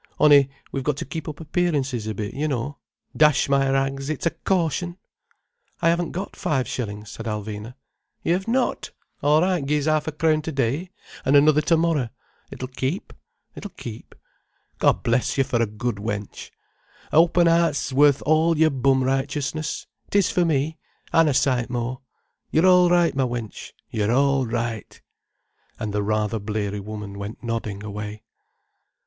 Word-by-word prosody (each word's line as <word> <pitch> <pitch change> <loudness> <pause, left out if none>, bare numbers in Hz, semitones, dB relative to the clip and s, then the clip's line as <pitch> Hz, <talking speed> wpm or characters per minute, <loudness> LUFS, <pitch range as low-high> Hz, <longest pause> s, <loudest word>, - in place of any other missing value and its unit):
On'y 145 -2 +6 0.2
we've 135 - -3
got 150 -1 0
to - - -4
keep 155 +3 -5
up 150 - -8
appearances 145 - -1
a 110 - -3
bit, 105 0 -4
you 150 +3 -1
know. 140 +1 -3 0.4
Dash 150 -2 +4
my 135 -1 +2
rags, 135 +1 0
it's 155 0 -3
a 170 - +3
caution!" 175 +1 -1 0.8
"I 165 - +3
haven't 170 0 +1
got 190 +3 -5
five 130 -6 -1
shillings—" 105 -3 -5
said 115 - -7
Alvina. 105 +2 -5 0.5
"Yer've 180 +4 0
not? 250 +2 0 0.3
All 150 +2 +4
right, 180 -4 +1
gi'e 150 +2 +1
's - - -3
ha 155 0 +3
'efcrown 155 0 0
today, 150 +2 -1 0.3
an' 135 - +2
t'other 150 +1 +6
termorrer. 160 -5 +2 0.4
It'll 130 - -6
keep, 130 +7 -3 0.4
it'll 205 - -8
keep. 115 -2 -9 0.6
God - - +3
bless 120 +3 +1
you 135 - +4
for 125 -3 0
a 115 - +2
good 110 +1 -3
wench. 105 -1 -5 0.6
A' - - +2
open 170 +1 +5
'eart 165 -2 +3
's 135 0 -3
worth 145 0 +4
all 160 +2 +3
your 160 0 +4
bum 135 0 +2
righteousness. 140 +3 -2 0.2
It - - -9
is 200 -2 +4
for 180 - +2
me. 155 0 0 0.3
An' 165 -1 +5
a 145 - +2
sight 125 -3 +2
more. 125 +2 -3 0.5
You're 160 +3 +3
all 180 -1 +6
right, 175 -1 +3
ma 135 -1 +2
wench, 120 -3 -6 0.2
you're 105 0 0
all 135 0 +2
right—" 115 -1 -4 0.8
And 105 -2 -4
the 105 - 0
rather 110 +1 0
bleary 105 -1 -3
woman 100 -1 -7
went 100 +4 -7
nodding 110 -3 -3
away. 105 +1 -6
135 Hz, 165 wpm, -23 LUFS, 115-155 Hz, 0.8 s, On'y